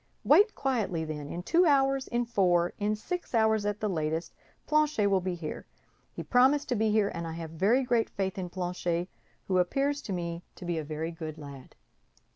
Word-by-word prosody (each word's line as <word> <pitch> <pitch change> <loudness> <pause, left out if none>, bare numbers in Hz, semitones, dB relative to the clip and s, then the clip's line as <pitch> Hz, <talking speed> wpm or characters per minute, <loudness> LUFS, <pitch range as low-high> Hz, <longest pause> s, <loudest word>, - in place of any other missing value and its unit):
Wait 420 +2 +5
quietly, 210 -12 -1
then; 150 -2 -6
in 175 - -5
two 345 - +4
hours, 270 -2 +3
in 240 0 0
four, 180 -6 +2
in 210 +1 +1
six 345 +6 -5
hours 220 -2 +3
at 205 +1 -3
latest, 160 -4 -1 0.3
Planchet 305 -8 +2
will 195 -2 +3
be 180 0 -2
here. 160 -3 -6 0.4
He - - -6
promised 270 +4 +3
to 245 - +1
be 220 0 +1
here, 210 -1 +2
and 170 0 -4
I 165 - -5
have 165 -1 -6
very 205 +11 +2
great 240 -3 +1
faith 190 -1 -3
in 180 -1 -4
Planchet, 175 -1 -2 0.4
who 185 -1 +2
appears 275 +10 0
to 205 - -7
me 170 -2 -3
to 180 - -9
be 170 -2 -1
a - - -4
very 155 +2 -4
good 160 -2 -7
lad." 140 -3 -11
190 Hz, 195 wpm, -29 LUFS, 170-245 Hz, 0.4 s, Wait